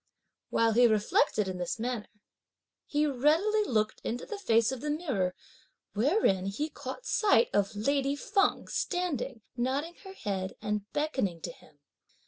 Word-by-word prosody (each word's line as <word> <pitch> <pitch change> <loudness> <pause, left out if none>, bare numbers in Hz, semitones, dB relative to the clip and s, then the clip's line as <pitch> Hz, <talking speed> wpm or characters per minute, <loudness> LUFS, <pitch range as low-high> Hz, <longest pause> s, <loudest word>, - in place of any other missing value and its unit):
While 230 0 +3
he 240 +2 +6
reflected 210 -1 +2
in 185 -1 -4
this 175 +4 -2
manner, 235 -1 -3 0.8
he 295 +1 +1
readily 315 - +3
looked 215 - 0
into 240 +2 -3
the 420 -2 -6
face 230 - +3
of 260 -2 -5
the 300 - -3
mirror, 265 - -1 0.6
wherein 210 - +2
he 290 +11 -2
caught 285 - -7
sight 440 +2 +3
of 205 +1 +1
lady 275 +5 +1
Feng 395 +7 +1
standing, 280 - -2
nodding 270 +7 -1
her 385 -1 -9
head 190 - -3
and 210 -1 -3
beckoning 265 - -1
to 170 - -4
him. 155 -2 -20
250 Hz, 145 wpm, -30 LUFS, 210-300 Hz, 0.8 s, he